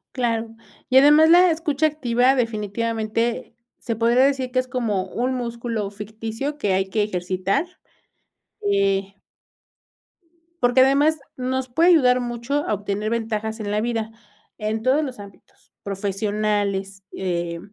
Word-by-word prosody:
Claro, 230 -3 -1 0.3
y 260 - +5
además 295 +3 +7
la 355 +1 +7
escucha 315 -2 0
activa 260 -4 +2
definitivamente 230 +1 -2 0.2
se 230 -1 -4
podría 235 +3 +3
decir 265 -2 0
que 255 - +1
es 255 - -2
como 230 -7 -1
un 255 +2 -1
músculo 235 -3 -3
ficticio 220 +7 -5
que 205 -10 0
hay 190 0 0
que 210 +2 +1
ejercitar. 185 - -1 1.0
Eh 195 -1 0 1.5
Porque 245 +1 +4
además 285 +4 +3 0.2
nos 260 0 -2
puede 330 +8 +3
ayudar 255 -7 +5
mucho 245 +4 -2
a - - 0
obtener 205 +1 -3
ventajas 220 -1 -3
en 205 -1 -4
la 210 - 0
vida, 225 -1 -2 0.5
en 215 0 -2
todos 265 +6 +2
los 260 -6 -6
ámbitos, 200 -1 -15
profesionales, 200 0 -2
eh, 170 -2 -3
230 Hz, 130 wpm, -22 LUFS, 205-260 Hz, 1.5 s, además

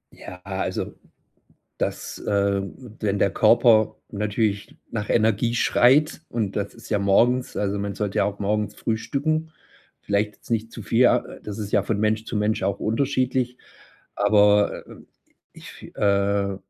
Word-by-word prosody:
Ja, 90 0 -11
also 95 0 -3 0.9
dass, - - -4
ähm 100 -1 0 0.3
wenn 100 -2 0
der 100 - +2
Körper 110 0 +4
natürlich 105 0 -2
nach 105 -2 -4
Energie 115 +1 +2
schreit 145 +8 +3
und 110 -4 -2
das 100 -1 -3
ist - - -13
ja 105 -3 +1
morgens 120 +6 +2
also 100 0 -1
man 100 -1 -3
sollte 105 -2 -2
ja - - +3
auch 100 0 -3
morgens 105 0 -1
frühstücken, 155 +8 -2 0.5
vielleicht 105 +1 -1
jetzt - - -20
nicht 115 0 -1
zu 115 - -9
viel, 115 +3 0
ja 125 -1 +5 0.2
das 105 0 -7
ist 105 -1 -5
ja 105 - +3
von 100 +1 -2
Mensch 110 +1 0
zu 110 - -4
Mensch 105 +1 0
auch 100 0 -1
unterschiedlich, 130 +1 0 0.6
Aber 105 0 +3 0.7
ich, - - -13
äh, 100 -1 +1
105 Hz, 145 wpm, -23 LUFS, 100-115 Hz, 0.9 s, ja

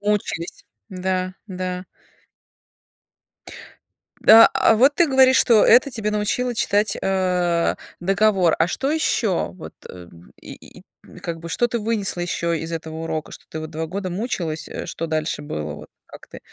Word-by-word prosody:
Мучились. 205 -5 -3 0.2
Да, 185 -1 -3
да. 185 -2 -5 2.4
А 225 +1 +9
а 225 - +4
вот 270 +6 +4
ты 345 - +3
говоришь, 265 -1 +5
что 225 -4 +5
это 255 +4 +5
тебя 220 -3 -3
научило 220 +4 -1
читать, 205 -1 0
э, 180 -3 0 0.2
договор. 195 -2 +2
А 165 - +2
что 270 +9 -2
ещё, 220 - 0
вот, 80 -3 -11 0.2
э, 90 -1 -11 0.3
и - - -13 0.3
и, - - -14
как 165 -1 -5
бы 170 0 -9
то 240 - +1
ты 235 0 -3
вынесла 210 -5 -2
ещё 170 -1 -2
из 165 0 -4
этого 160 -1 -6
урока? 160 -1 -4
Что - - -12
ты 160 - -6
вот 155 0 -7
2 160 0 -4
года 190 +2 -4
мучилась, 175 -6 -4
э, - - -6
что 165 - -5
дальше 155 -1 -2
было, 75 - -5
вот 75 0 -12 0.2
как - - -14
ты? - - -11
185 Hz, 160 wpm, -21 LUFS, 165-215 Hz, 2.4 s, А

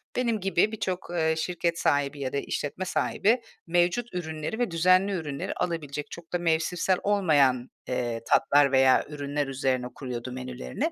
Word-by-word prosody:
benim 235 -3 +1
gibi 195 +1 +2
birçok, 190 -4 -3
eee, 160 -2 +1
şirket 170 0 -1
sahibi 145 -1 +1
ya 130 -2 -3
da - - 0
işletme 145 +5 -3
sahibi, 225 +5 +1 0.3
mevcut 175 +7 +1
ürünleri 160 +3 -4
ve 245 -6 0
düzenli 185 +4 +4
ürünleri 165 0 -3
alabilecek, 150 -4 -3
çok 170 0 -10
da - - +3
mevsimsel 175 +2 +1
olmayan, 145 -11 +3 0.2
eee, 120 -2 -2
tatlar 145 -1 +4
veya 130 -1 +5
ürünler 145 -1 -2
üzerine 130 -2 -1
kuruyordu 125 -2 -5
menülerini 130 - -4
160 Hz, 150 wpm, -27 LUFS, 140-185 Hz, 0.3 s, veya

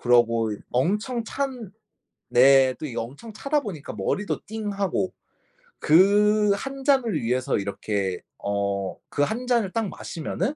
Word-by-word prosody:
그러고 115 -2 +3
이 105 - -6
엄청 210 - 0
찬 255 -5 -4 0.6
네 130 +1 +6
또 155 - -5
이게 125 - -7
엄청 140 - -7
차다 290 +6 0
보니까 185 - -7
머리도 105 - -2
띵하고. 200 -3 -2 0.7
그 205 +5 +5
1 270 +4 -6
잔을 265 -6 +2
위해서 125 +2 0
이렇게 100 -2 -2 0.2
어 100 -1 -2
그 - - -2
1 235 +10 -2
잔을 235 -6 +2
딱 225 -1 -1
마시면은 175 - -4
190 Hz, 240 characters per minute, -25 LUFS, -, 0.7 s, 네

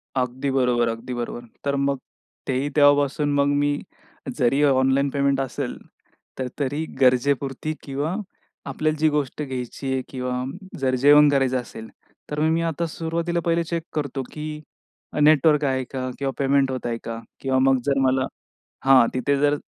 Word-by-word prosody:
अगदी 130 +1 -1
बरोबर 125 -3 +2
अगदी 115 +2 -5
बरोबर. 120 0 -5 0.2
तर 140 0 +1
मग 140 0 0 0.5
तेही 135 +2 0
तेव्हापासून 145 0 +4
मग 140 0 +3
मी 145 0 +1 0.6
जरी 135 +2 +2
ऑनलाईन 135 0 +3
पेमेंट 140 -1 +1
असेल 135 0 -4 0.6
तर 130 - -1
तरी 145 +3 -1 0.2
गरजेपुरती 135 +3 +2
किंवा 145 +5 -2 0.5
आपल्याला 155 +3 -1
जी 155 0 +4
गोष्ट 145 -1 -2
घ्यायची 130 -1 -4
आहे 130 - 0
किंवा 125 -1 -3 0.4
जर 130 -1 +1
जेवण 145 +3 +6
करायचं 135 -2 +2
असेल, 110 -2 -10 0.4
तर 150 - -2
मग 155 +1 +3
मी 165 - +1
आता 165 0 -1
सुरुवातीला 165 +2 -2
पहिले 170 0 +2
चेक 165 0 -3
करतो, 140 -3 -2
की 150 0 -6 0.6
नेटवर्क 150 0 +5
आहे 130 -1 0
का? 130 -1 -3
किंवा 135 -1 -1
पेमेंट 140 -1 +2
होतंय 120 -2 -3
का? 115 0 -5 0.2
किंवा 130 -1 +1
मग 135 0 +4
जर 135 -1 +2
मला, 130 0 +2 0.6
हां 130 -3 +7
तिथे 140 +2 +1
जर 145 0 +3
140 Hz, 155 wpm, -23 LUFS, 130-145 Hz, 0.6 s, हां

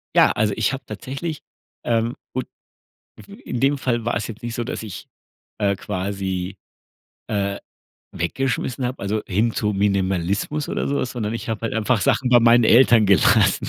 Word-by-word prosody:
Ja, - - +7
also 105 -1 +1
ich - - +1
habe 135 - -5
tatsächlich 135 +9 -5 0.4
ähm, 115 0 0 0.2
und 130 - -2 0.8
mhm, - - -12
in 120 - -3
dem 140 +2 +2
Fall 120 -3 -1
war 120 - 0
es 100 - -2
jetzt 115 -2 -9
nicht 120 -1 -4
so, 120 - -2
dass 115 - -5
ich, 105 -5 -8 0.5
äh, 100 -2 +2
quasi, 95 -1 -3 0.7
äh, 100 -2 -1 0.6
weggeschmissen 125 +7 -2
habe, 125 +1 -3
also, 105 +2 -1
hin 110 +5 +1
zum 105 -2 -1
Minimalismus 100 - 0
oder - - -2
so 140 - 0
was, 125 - -2
sondern 110 -4 -3
ich 115 - -5
habe 110 -1 -3
halt 115 - -2
einfach 115 +1 +1
Sachen 130 - +2
bei 120 -1 +6
meinen 120 +1 +6
Eltern 115 -1 +6
gelassen. 95 -5 +4
110 Hz, 175 wpm, -22 LUFS, 100-125 Hz, 0.8 s, Ja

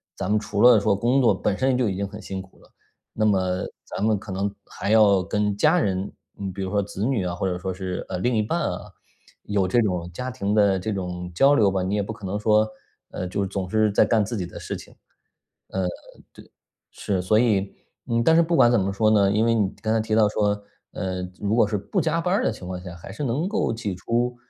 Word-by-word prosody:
咱 90 - -3
们 105 - +3
除 105 -1 -3
了 120 -3 +8
说 100 0 +2
工 120 +6 +2
作 120 - +4
本 100 - -1
身 130 -1 +2
就 125 -4 +1
已 95 - -3
经 100 0 -2
很 105 +2 -9
辛 95 -2 -5
苦 95 0 -17
了， - - -22 0.4
那 110 - 0
么 95 -3 +1 0.2
咱 - - -7
们 110 0 +2
可 100 0 -9
能 100 +2 -2
还 100 - -4
要 105 -3 +5
跟 105 +3 -1
家 155 +10 +4
人， 95 - 0 0.3
嗯， 95 -2 -4
比 100 - -6
如 95 - -4
说 100 0 +2
子 100 +1 -4
女 120 -7 0
啊， 90 -1 -2
或 90 - -3
者 90 -1 -3
说 95 +1 -3
是， 95 -1 -5
呃， 90 - -4
另 125 +6 0
一 110 - +2
半 110 +11 -1
啊， 90 - -2 0.6
有 100 -2 0
这 120 +6 +3
种 90 -5 -1
家 125 +7 -4
庭 105 -5 -2
的 100 -3 +4
这 105 +4 -3
种 90 -2 -4
交 135 +8 +5
流 110 -8 +4
吧， 95 -1 -1
你 95 +3 -1
也 105 - +1
不 110 - -5
可 105 -2 -10
能 100 +2 -2
说， 110 0 +3 0.5
呃， 90 - -4
就 95 +2 -2
是 - - -2
总 95 -2 -4
是 110 +1 +2
在 100 - +4
干 115 -3 +2
自 110 +3 -4
己 90 - -2
的 90 - -10
事 - - -5
情。 - - -14 0.7
呃， 95 -1 -2 0.5
对， - - -16 0.4
是， 95 -3 -2
所 105 +4 +3
以 105 -5 +2 0.4
嗯， 115 0 +1
但 160 - +5
是 170 - +6
不 170 +1 +1
管 120 - +6
怎 120 - +3
么 95 +1 -1
说 110 +2 +2
呢， 100 -2 +4
因 105 +2 +2
为 115 0 +3
你 105 -4 +1
刚 110 -1 0
才 115 - +2
提 110 0 -1
到 110 -2 +5
说， 105 -1 0 0.3
呃， 95 0 -3 0.2
如 105 +1 0
果 115 -2 +4
是 105 -1 -1
不 185 - -2
加 165 +1 0
班 180 +2 0
儿 205 - +2
的 - - +2
情 90 - -9
况 90 0 -5
下， 90 -1 -8
还 85 +3 -10
是 110 - -6
能 140 +5 -1
够 220 - 0
挤 110 -4 -3
出， 120 +6 -1
105 Hz, 275 characters per minute, -24 LUFS, 95-115 Hz, 0.7 s, 了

